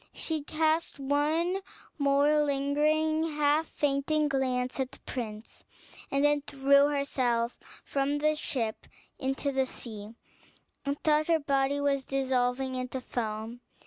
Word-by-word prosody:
She 315 Hz, -2 st, 0 dB
cast 315 Hz, +2 st, 0 dB
one 310 Hz, +7 st, +1 dB, 0.4 s
more 285 Hz, +2 st, +3 dB
lingering, 305 Hz, +3 st, +1 dB
half 300 Hz, +2 st, +2 dB
fainting 295 Hz, +1 st, 0 dB
glance 255 Hz, -2 st, -1 dB
at 265 Hz, 0 st, -1 dB
the -, -, -13 dB
prince, 220 Hz, -3 st, -7 dB, 0.5 s
and 275 Hz, +1 st, +2 dB
then 295 Hz, 0 st, +3 dB
threw 280 Hz, 0 st, +4 dB
herself 255 Hz, -5 st, 0 dB, 0.3 s
from 280 Hz, +1 st, 0 dB
the 305 Hz, +1 st, +2 dB
ship 235 Hz, -7 st, -2 dB, 0.3 s
into 270 Hz, +1 st, -1 dB
the 265 Hz, -1 st, +1 dB
sea, 220 Hz, -3 st, -7 dB, 0.7 s
and 280 Hz, 0 st, -2 dB
thought 305 Hz, 0 st, +3 dB
her 335 Hz, -1 st, +4 dB
body 280 Hz, -1 st, +1 dB
was 280 Hz, -1 st, +1 dB
dissolving 260 Hz, -1 st, 0 dB
into 255 Hz, 0 st, -3 dB
foam. 225 Hz, -1 st, -4 dB
280 Hz, 125 wpm, -29 LUFS, 260-300 Hz, 0.7 s, threw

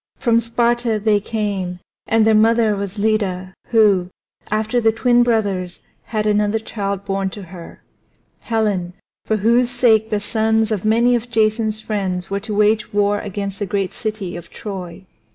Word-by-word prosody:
From 230 Hz, -3 st, +2 dB
Sparta 235 Hz, 0 st, 0 dB
they 210 Hz, 0 st, +2 dB
came, 200 Hz, -4 st, -3 dB, 0.3 s
and 225 Hz, -1 st, +3 dB
their 220 Hz, -, +4 dB
mother 220 Hz, 0 st, +4 dB
was 200 Hz, 0 st, -5 dB
Leda, 200 Hz, -3 st, -1 dB
who, 205 Hz, -6 st, +3 dB, 0.4 s
after 215 Hz, +3 st, 0 dB
the 225 Hz, -1 st, +4 dB
twin 240 Hz, +2 st, +3 dB
brothers, 200 Hz, -7 st, 0 dB, 0.3 s
had 215 Hz, -2 st, -2 dB
another 210 Hz, 0 st, +2 dB
child 200 Hz, -3 st, -4 dB
born 195 Hz, 0 st, -1 dB
to 200 Hz, +1 st, -9 dB
her 175 Hz, -1 st, -12 dB, 0.6 s
Helen, 205 Hz, -6 st, -1 dB, 0.3 s
for 220 Hz, -, +1 dB
whose 235 Hz, +4 st, +3 dB
sake 225 Hz, -3 st, +3 dB
the 210 Hz, -2 st, 0 dB
sons 220 Hz, +1 st, 0 dB
of 210 Hz, -4 st, -1 dB
many 230 Hz, +3 st, +3 dB
of 240 Hz, +1 st, -3 dB
Jason's 220 Hz, -1 st, +1 dB
friends 190 Hz, -4 st, -3 dB
were 200 Hz, -, 0 dB
to 210 Hz, +1 st, -5 dB
wage 215 Hz, +1 st, +2 dB
war 205 Hz, 0 st, +1 dB
against 200 Hz, -1 st, -5 dB
the 205 Hz, -, -2 dB
great 195 Hz, -1 st, -2 dB
city 215 Hz, -5 st, -4 dB
of 175 Hz, -, -9 dB
Troy. 190 Hz, -3 st, -8 dB
215 Hz, 160 wpm, -19 LUFS, 195-225 Hz, 0.6 s, their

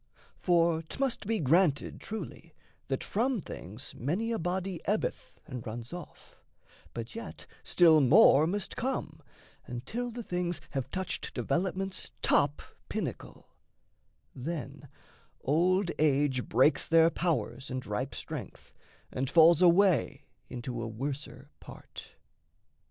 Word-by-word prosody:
For 170 Hz, -2 st, +3 dB
'tmust 240 Hz, -, -2 dB
be 225 Hz, -1 st, +1 dB
granted, 155 Hz, 0 st, +2 dB
truly, 170 Hz, -6 st, -7 dB, 0.3 s
that 135 Hz, -1 st, -2 dB
from 240 Hz, +3 st, 0 dB
things 110 Hz, -, -8 dB
Many 185 Hz, -, -1 dB
a 230 Hz, -, -1 dB
body 180 Hz, +1 st, -2 dB
ebbeth 210 Hz, +3 st, -2 dB
and 125 Hz, -6 st, -7 dB
runs 115 Hz, +3 st, -7 dB
off; 175 Hz, 0 st, -11 dB, 0.5 s
But 115 Hz, 0 st, -6 dB
yet 230 Hz, -2 st, -8 dB, 0.2 s
still 160 Hz, -3 st, +5 dB
more 150 Hz, -, +6 dB
must 200 Hz, +3 st, -2 dB
come, 230 Hz, -, -3 dB, 0.5 s
until 175 Hz, -, -4 dB
the 240 Hz, 0 st, -6 dB
things 180 Hz, -3 st, -2 dB
Have 135 Hz, -3 st, -3 dB
touched 185 Hz, -1 st, -4 dB
development's 190 Hz, +1 st, -1 dB
top 145 Hz, 0 st, +2 dB, 0.3 s
pinnacle; -, -, -5 dB, 0.8 s
Then 145 Hz, +1 st, -6 dB, 0.5 s
old 175 Hz, +6 st, +2 dB
age 140 Hz, -4 st, +2 dB
breaks 130 Hz, +7 st, +4 dB
their 165 Hz, 0 st, +5 dB
powers 160 Hz, -7 st, -2 dB
and 130 Hz, -1 st, -4 dB
ripe 120 Hz, +5 st, -3 dB
strength -, -, -7 dB, 0.4 s
And 130 Hz, 0 st, -2 dB
falls 165 Hz, +1 st, +6 dB
away 180 Hz, -1 st, +4 dB, 0.2 s
into 120 Hz, -1 st, -5 dB
a 115 Hz, -, -3 dB
worser 135 Hz, +6 st, -6 dB
part. -, -, -12 dB
165 Hz, 120 wpm, -30 LUFS, 135-185 Hz, 0.8 s, more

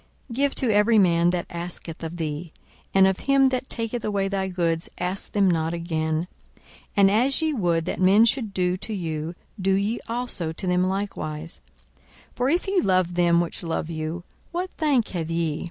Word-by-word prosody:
42:006:030 -, -, -5 dB
Give 280 Hz, 0 st, +2 dB
to 250 Hz, -4 st, +1 dB
every 210 Hz, +2 st, +4 dB
man 170 Hz, -3 st, +4 dB
that 175 Hz, -1 st, -1 dB
asketh 170 Hz, -1 st, -6 dB
of 165 Hz, +1 st, -5 dB
thee; 155 Hz, 0 st, -4 dB, 0.4 s
and 195 Hz, 0 st, +6 dB
of 190 Hz, -1 st, +2 dB
him 275 Hz, -1 st, +4 dB
that 260 Hz, 0 st, -3 dB
taketh 230 Hz, 0 st, -3 dB
away 200 Hz, -2 st, 0 dB
thy 195 Hz, -1 st, -1 dB
goods 170 Hz, -3 st, -1 dB
ask 180 Hz, +2 st, -3 dB
them 200 Hz, -2 st, +3 dB
not 165 Hz, -1 st, +1 dB
again. 160 Hz, -1 st, -1 dB, 0.3 s
42:006:031 -, -, -28 dB, 0.3 s
And 195 Hz, -1 st, +6 dB
as 255 Hz, +8 st, +2 dB
ye 315 Hz, -1 st, +1 dB
would 170 Hz, -, +1 dB
that 180 Hz, -, -3 dB
men 200 Hz, +5 st, +6 dB
should 235 Hz, -3 st, +1 dB
do 180 Hz, -1 st, 0 dB
to 220 Hz, -, -6 dB
you, 165 Hz, -2 st, -3 dB, 0.3 s
do 190 Hz, +1 st, +2 dB
ye 200 Hz, +4 st, 0 dB
also 230 Hz, -9 st, -2 dB
to 160 Hz, -, -6 dB
them 180 Hz, 0 st, +2 dB
likewise. 165 Hz, -5 st, -4 dB, 0.7 s
42:006:032 -, -, -35 dB
For 250 Hz, +2 st, +1 dB
if 345 Hz, +6 st, +1 dB
ye 385 Hz, -1 st, +2 dB
love 185 Hz, -, +2 dB
them 175 Hz, -1 st, +4 dB
which 170 Hz, -, -4 dB
love 165 Hz, -1 st, -3 dB
you, 160 Hz, +2 st, -4 dB, 0.3 s
what 360 Hz, +1 st, -3 dB
thank 280 Hz, -8 st, +1 dB
have 165 Hz, -3 st, -3 dB
ye? 165 Hz, -2 st, -1 dB
185 Hz, 195 wpm, -24 LUFS, 170-220 Hz, 0.7 s, and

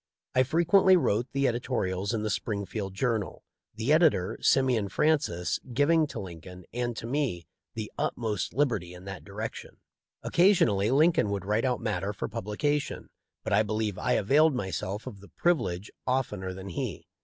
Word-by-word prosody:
I 130 Hz, -, +4 dB
frequently 175 Hz, +7 st, +5 dB
wrote 120 Hz, -7 st, +1 dB
the 140 Hz, 0 st, +1 dB
editorials 100 Hz, -6 st, -1 dB
in 110 Hz, -2 st, -1 dB
the 110 Hz, -, -1 dB
Springfield 100 Hz, -1 st, -3 dB
Journal, 115 Hz, -2 st, -1 dB, 0.3 s
the 115 Hz, +7 st, +1 dB
editor, 155 Hz, -, +3 dB
Simeon 125 Hz, -7 st, +3 dB
Francis, 120 Hz, -, +1 dB
giving 155 Hz, +4 st, +3 dB
to -, -, -6 dB
Lincoln 90 Hz, 0 st, -9 dB
and 120 Hz, -1 st, -2 dB
to -, -, -5 dB
me 120 Hz, -, -1 dB, 0.3 s
the 110 Hz, -2 st, -5 dB
utmost 110 Hz, -4 st, -1 dB
liberty 110 Hz, -10 st, 0 dB
in 90 Hz, +1 st, -12 dB
that 95 Hz, -1 st, -7 dB
direction. 105 Hz, +3 st, -7 dB, 0.5 s
Occasionally 120 Hz, -, +3 dB
Lincoln 155 Hz, -2 st, +4 dB
would 100 Hz, -1 st, -3 dB
write 105 Hz, +5 st, +1 dB
out 125 Hz, -1 st, 0 dB
matter 105 Hz, -2 st, -2 dB
for -, -, -4 dB
publication, 120 Hz, +7 st, -2 dB, 0.3 s
but -, -, -2 dB
I -, -, +5 dB
believe 105 Hz, -2 st, -2 dB
I -, -, +1 dB
availed 145 Hz, +8 st, +4 dB
myself 95 Hz, -1 st, -3 dB
of 100 Hz, -, -8 dB
the 100 Hz, -, -15 dB
privilege 120 Hz, -, 0 dB, 0.2 s
oftener 105 Hz, -8 st, -1 dB
than 95 Hz, +1 st, -8 dB
he. 85 Hz, -, -4 dB
110 Hz, 155 wpm, -28 LUFS, 100-140 Hz, 0.5 s, frequently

